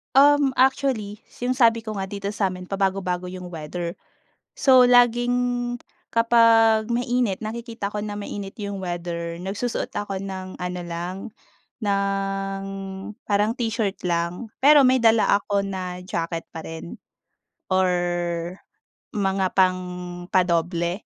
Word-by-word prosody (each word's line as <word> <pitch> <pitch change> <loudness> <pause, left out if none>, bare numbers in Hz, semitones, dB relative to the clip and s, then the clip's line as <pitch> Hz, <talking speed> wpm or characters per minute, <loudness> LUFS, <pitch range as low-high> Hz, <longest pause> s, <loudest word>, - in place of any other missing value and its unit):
Um, 285 0 +6
actually, 255 -6 +1 0.2
'yong 250 +1 0
sabi 230 -3 +4
ko 215 -1 -6
nga 195 - -2
dito 200 +1 -5
sa'min 185 -2 -2
pabago-bago 190 -2 -1
'yong 180 -1 -7
weather. 170 +1 -5 0.6
So, 255 -2 +6
laging, 245 0 +3 0.3
kapag 230 -1 +4
mainit, 240 -3 0
nakikita 225 -1 -5
ko 210 - -3
na 205 0 -4
mainit 200 -1 -6
'yong 200 -3 -5
weather 170 -2 -4
nagsusuot 205 +5 -3
ako 195 -2 -4
ng 190 -1 -6
ano 180 0 -4
lang, 170 +2 -4 0.6
ng 195 -1 -1 0.6
parang 210 +2 +1
t-shirt 225 -5 -2
lang. 175 +5 -2
Pero 290 +1 +7
may 260 0 +5
dala 225 -2 +4
ako 200 0 -1
na 185 -2 -5
jacket 165 -2 -3
pa 160 -1 -8
rin, 165 +1 -8 0.7
or 185 -1 +3 1.2
mga 195 -3 0
pangpa-doble, 180 -1 0
195 Hz, 115 wpm, -24 LUFS, 180-230 Hz, 1.2 s, Pero